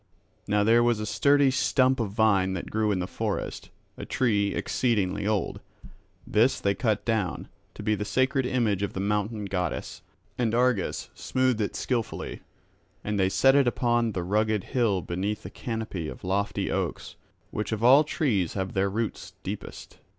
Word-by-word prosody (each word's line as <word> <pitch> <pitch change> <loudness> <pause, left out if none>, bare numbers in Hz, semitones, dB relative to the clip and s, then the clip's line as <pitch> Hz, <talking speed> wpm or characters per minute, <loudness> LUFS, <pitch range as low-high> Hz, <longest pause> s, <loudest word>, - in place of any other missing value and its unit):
Now 105 0 +2
there 115 +3 +5
was 120 -2 +2
a 105 - -3
sturdy 140 +4 +3
stump 130 0 +2
of 115 -3 -1
vine 100 -3 +2
that 95 - -5
grew 110 -1 +1
in 100 - +1
the 90 - -1
forest, - - -4 0.3
a - - -7
tree 105 -5 +1
exceeding 105 -5 0
old; 105 -4 -1 0.7
this 115 +5 +2
they 100 - +1
cut 110 -1 -1
down, 110 -6 -1 0.3
to - - -8
be 110 - +1
the 105 - -2
sacred 130 +5 +1
image 115 -7 +1
of 100 - -2
the - - -4
mountain 105 +1 -1
goddess; 90 -4 -3 0.4
and 115 -2 +1
Argus 125 -5 0
smoothed 130 -3 0
it 100 - -2
skilfully, 120 -4 -3 0.6
and 105 -1 -2
they 95 0 +3
set 135 +7 +4
it 140 -2 +4
upon 120 -2 +1
that 90 - -2
rugged 105 +2 +1
hill 115 -8 0
beneath 100 +5 -3
a - - -7
canopy 110 -8 -4
of - - -9
lofty 100 +2 -1
oaks, - - -3 0.4
which 105 - -3
of 110 0 -2
all 135 +5 +7
trees 120 - 0
have 95 -1 -3
their 95 +1 +1
roots 100 -3 -4
deepest. 100 +2 -7
105 Hz, 170 wpm, -27 LUFS, 100-120 Hz, 0.7 s, all